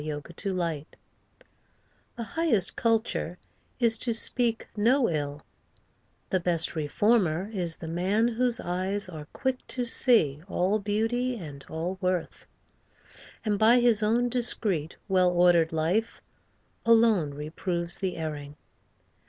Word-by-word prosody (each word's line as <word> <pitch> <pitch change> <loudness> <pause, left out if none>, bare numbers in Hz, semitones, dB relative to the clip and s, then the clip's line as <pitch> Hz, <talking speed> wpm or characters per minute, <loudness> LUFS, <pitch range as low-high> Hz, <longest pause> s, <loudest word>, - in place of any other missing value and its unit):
TRUE 150 -1 -4
CULTURE 170 -2 -4 1.3
The 235 - -5
highest 225 - 0
culture 225 -6 -1 0.4
is 230 -2 +3
to 235 -2 +1
speak 230 0 +2
no 235 +4 +2
ill, 145 -2 -4 0.9
The 185 - +2
best 170 -2 -1
reformer 185 +3 0
is 175 -5 0
the 165 - -8
man 190 +7 0
whose 240 0 +1
eyes 185 +3 0
Are 155 -4 -9
quick 260 -1 -2
to 250 -1 -1
see 220 - +5
all 190 +5 0
beauty 225 +5 -1
and 145 -7 -10
all 170 +4 -5
worth; 180 -2 -3 1.0
And 210 -2 -1
by 230 +3 +5
his 235 -3 +4
own 230 +3 +1
discreet, 215 -9 +1
well 185 -2 +3
ordered 175 -2 +3
life, 170 +8 -1 0.6
Alone 225 -10 +3
reproves 170 +4 -2
the 185 -3 -3
erring. 150 -3 -6
190 Hz, 120 wpm, -26 LUFS, 165-230 Hz, 1.3 s, see